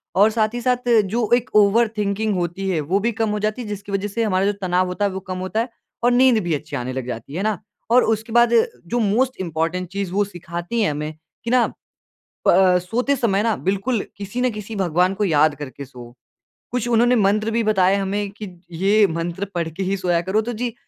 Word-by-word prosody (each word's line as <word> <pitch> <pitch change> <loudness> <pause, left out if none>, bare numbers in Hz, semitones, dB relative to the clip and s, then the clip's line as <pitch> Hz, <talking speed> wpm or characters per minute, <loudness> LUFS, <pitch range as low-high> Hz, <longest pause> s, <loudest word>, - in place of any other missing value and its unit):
और 205 +3 +6
साथ 215 0 0
ही 240 - -3
साथ 250 0 0 0.2
जो 220 +3 -1
एक 245 0 -2
ओवर 210 +3 +5
थिंकिंग 210 +1 0
होती 180 +2 -2
है 175 -4 0
वो 175 +7 0
भी 230 +4 0
कम 225 -1 -1
हो 210 0 -1
जाती 215 +4 -2
है। 230 - -7
जिसकी 205 -1 -6
वजह 195 +1 -1
से 230 +3 -2
हमारा 195 -3 +1
जो 205 - +2
तनाव 185 0 +1
होता 180 +3 -1
है 200 - 0
वो 190 - -4
कम 185 -1 -6
होता 185 +4 -2
है 240 - -4 0.3
और 245 - +4
नींद 250 -1 +5
भी 170 -2 -1
अच्छी 150 0 -4
आने 130 -1 -3
लग 130 -1 -4
जाती 125 +2 -6
है। - - -4
है 190 - -2
ना? 215 -4 0 0.3
और 245 +1 +6
उसके 220 0 -1
बाद 235 0 +5 0.3
जो 240 +7 -1
मोस्ट 240 +5 +1
इम्पोर्टेंट 170 +1 -2
चीज़ 195 -2 -3
वो 205 +2 +2
सिखाती 175 +3 -4
हैं 205 - +2
हमें 150 +1 -4 0.3
कि 235 - -3
ना 250 -1 +4 0.8
प - - +7
अ, 185 -1 +5
सोते 240 +10 0
समय 215 -6 +1
ना 225 -2 +1
बिल्कुल 200 +5 -1 0.2
किसी 200 +5 -4
ना 255 - +2
किसी 215 -1 -7
भगवान 180 -1 +1
को 205 +1 -1
याद 155 -3 +3
करके 140 -1 -8
सोओ। 125 -2 -12 0.6
कुछ 240 -1 -1
उन्होंने 240 +1 +4
मंत्र 215 +1 +2
भी 230 +1 +1
बताया 195 -2 +3
हमें 200 +1 -2
कि 210 +1 -8 0.3
ये 200 +5 +3
मंत्र 170 +3 -3
पढ़ 170 -2 -1
के 170 +5 -5
ही 195 +1 -1
सोया 180 -2 +1
करो, 190 +5 0
तो 240 +2 -4
जी 235 +1 -3
200 Hz, 235 wpm, -21 LUFS, 180-225 Hz, 0.8 s, प